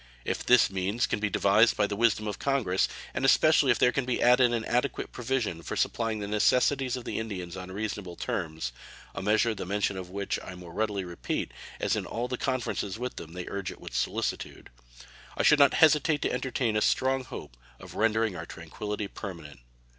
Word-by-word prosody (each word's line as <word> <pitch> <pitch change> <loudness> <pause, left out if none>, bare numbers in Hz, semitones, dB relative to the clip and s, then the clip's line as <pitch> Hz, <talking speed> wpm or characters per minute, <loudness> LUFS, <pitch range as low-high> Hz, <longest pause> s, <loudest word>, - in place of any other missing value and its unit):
If - - -2
these 125 -5 +5
means 95 +5 0
can - - -2
be 105 0 0
devised 100 +4 +4
by 105 - +3
the 100 - -3
wisdom 110 -1 +2
of 105 - -4
Congress, 125 -10 +1 0.3
and 130 - -3
especially 145 +1 +5
if 120 - +4
there 125 - +4
can 135 - 0
be 125 -1 -1
added 125 0 +5
an 115 -2 -1
adequate 125 +3 -1
provision 120 -9 -2
for - - -5
supplying 115 -2 0
the 100 -1 -4
necessities 125 +5 +2
of 125 - -8
the - - -3
Indians 95 -5 -5
on 95 0 -7
reasonable 100 -3 -4
terms 80 -6 -3 0.4
(a - - -5
measure 110 +3 +2
the 100 - -5
mention 100 +1 -1
of 90 -1 -6
which 100 +1 -3
I - - -10
the 90 - -8
more 90 -2 -11
readily 105 -2 -1
repeat, 85 -8 -4 0.3
as - - +1
in - - -3
all 120 +2 -3
the 125 -1 -4
conferences 125 -6 -2
with 125 +1 -5
them 80 0 -8
they 90 0 -5
urge 100 -2 -4
it - - -12
with - - -9
solicitude), - - -3 0.7
I - - +1
should 150 - +6
not 140 -2 +6
hesitate 155 -1 +4
to - - 0
entertain 125 -3 -1
a 110 - +2
strong 130 +3 +2
hope 85 - -9 0.2
of - - -11
rendering 110 -2 +1
our 85 -1 -6
tranquillity 105 +6 -5
permanent. 85 -9 -8
110 Hz, 205 wpm, -28 LUFS, 95-125 Hz, 0.7 s, should